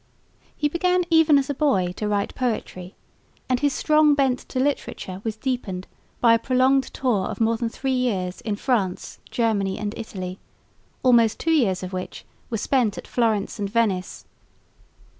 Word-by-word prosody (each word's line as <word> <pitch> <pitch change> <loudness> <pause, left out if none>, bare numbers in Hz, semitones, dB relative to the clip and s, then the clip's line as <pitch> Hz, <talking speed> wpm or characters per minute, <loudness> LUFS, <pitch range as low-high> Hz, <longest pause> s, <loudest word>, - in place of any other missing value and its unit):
He 295 - +1
began 360 +3 +1
even 320 -2 +6
as 275 -1 +1
a - - -1
boy 205 -12 +1
to 210 - -2
write 205 -1 -1
poetry, 215 -7 -3 0.5
and 255 -1 +1
his 285 +1 +2
strong 305 0 +3
bent 265 -3 +2
to 255 - -5
literature 255 -8 -2
was 220 -1 -3
deepened 220 -7 -3 0.3
by 235 -1 +5
a 230 - +3
prolonged 260 +2 +3
tour 225 -8 0
of - - -6
more 230 0 +2
than 230 0 -2
three 265 +3 -3
years 200 -8 -1
in 210 -2 -2
France, 205 -5 -2
Germany 205 -5 0
and 210 0 -3
Italy, 185 -4 -6 0.6
almost 235 -4 +4
two 325 - 0
years 195 - +2
of 185 +1 -6
which 185 0 -6 0.2
were 225 - -2
spent 230 -1 +1
at - - -7
Florence 220 -3 0
and 200 -1 -2
Venice. 200 -4 -1
230 Hz, 165 wpm, -23 LUFS, 200-265 Hz, 0.6 s, even